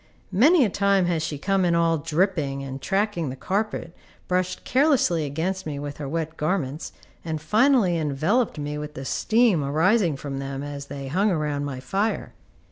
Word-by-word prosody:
Many 275 Hz, -, +5 dB
a -, -, 0 dB
time 200 Hz, -1 st, +2 dB
has 170 Hz, -2 st, 0 dB
she 155 Hz, -2 st, -3 dB
come 195 Hz, +5 st, +1 dB
in 170 Hz, -1 st, +2 dB
all 165 Hz, -1 st, +2 dB
dripping, 155 Hz, -4 st, 0 dB
and 135 Hz, 0 st, -6 dB
tracking 195 Hz, -6 st, 0 dB
the 130 Hz, -, -5 dB
carpet, 195 Hz, 0 st, -2 dB, 0.3 s
brushed 185 Hz, 0 st, -1 dB
carelessly 255 Hz, -, +2 dB
against 165 Hz, +6 st, -3 dB
me 145 Hz, -2 st, -4 dB
with 145 Hz, 0 st, -6 dB
her 145 Hz, -2 st, -5 dB
wet 160 Hz, +1 st, -3 dB
garments, 155 Hz, -3 st, -2 dB, 0.3 s
and 160 Hz, -2 st, -3 dB
finally 210 Hz, -, +3 dB
enveloped 160 Hz, -, 0 dB
me 150 Hz, 0 st, -4 dB
with 150 Hz, 0 st, -7 dB
the 135 Hz, -, -6 dB
steam 220 Hz, -, +2 dB
arising 165 Hz, +3 st, +2 dB
from 135 Hz, -1 st, -5 dB
them 135 Hz, 0 st, -5 dB
as 145 Hz, -1 st, -6 dB
they 140 Hz, -1 st, -6 dB
hung 190 Hz, +9 st, +1 dB
around 150 Hz, -5 st, -1 dB
my 135 Hz, -3 st, -5 dB
fire. 195 Hz, -, -2 dB
165 Hz, 175 wpm, -24 LUFS, 145-195 Hz, 0.3 s, Many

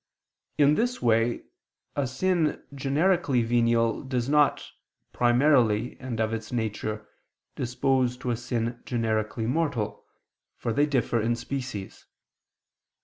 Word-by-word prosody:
In 145 Hz, -1 st, +5 dB
this 245 Hz, +8 st, 0 dB
way, 115 Hz, 0 st, +2 dB, 0.5 s
a 140 Hz, -2 st, 0 dB
sin 165 Hz, +4 st, 0 dB
generically 140 Hz, -1 st, +1 dB
venial 115 Hz, -1 st, +2 dB
does 130 Hz, -3 st, -2 dB
not, 145 Hz, 0 st, +3 dB, 0.5 s
primarily 120 Hz, -3 st, +3 dB
and 125 Hz, -4 st, -5 dB
of 110 Hz, 0 st, 0 dB
its 115 Hz, 0 st, -5 dB
nature, 110 Hz, -2 st, -3 dB, 0.5 s
dispose 125 Hz, 0 st, 0 dB
to 125 Hz, -1 st, -3 dB
a -, -, +1 dB
sin 120 Hz, 0 st, -3 dB
generically 110 Hz, -2 st, -1 dB
mortal, 130 Hz, -4 st, -1 dB, 0.5 s
for 115 Hz, -, -2 dB
they 145 Hz, +4 st, +3 dB
differ 125 Hz, -4 st, +1 dB
in 120 Hz, +2 st, +1 dB
species. 125 Hz, -4 st, -6 dB
120 Hz, 115 wpm, -27 LUFS, 115-140 Hz, 0.5 s, In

